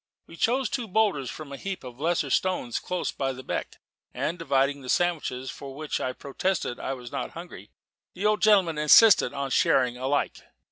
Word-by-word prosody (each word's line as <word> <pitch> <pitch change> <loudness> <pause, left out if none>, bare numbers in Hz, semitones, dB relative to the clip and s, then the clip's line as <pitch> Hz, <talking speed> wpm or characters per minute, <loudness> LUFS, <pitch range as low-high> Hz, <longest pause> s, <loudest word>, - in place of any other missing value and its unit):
We 165 - -13
chose 250 +8 +1
two 245 -4 -3
boulders 190 - +1
from 155 -3 -8
a 140 - -6
heap 195 0 -5
of 125 -1 -10
lesser 160 -3 0
stones 180 -10 0
close 180 -1 -3
beside 135 -1 -2
the 130 - -9
beck, - - -4 0.4
and 170 +3 -2
divided 140 -3 +1
the 130 - -9
sandwiches, 150 -7 0
for 140 +3 -8
though - - -2
I 130 - -1
protested 140 0 -2
I 135 - -3
was 125 -2 -10
not - - -4
hungry, 170 - -10 0.5
the 195 - -4
old 210 0 +2
gentleman 190 -7 +4
insisted 195 +8 +7
on 140 - -7
our 135 -1 -3
sharing 125 -2 +3
alike. 135 +3 -1
150 Hz, 190 wpm, -26 LUFS, 135-185 Hz, 0.5 s, insisted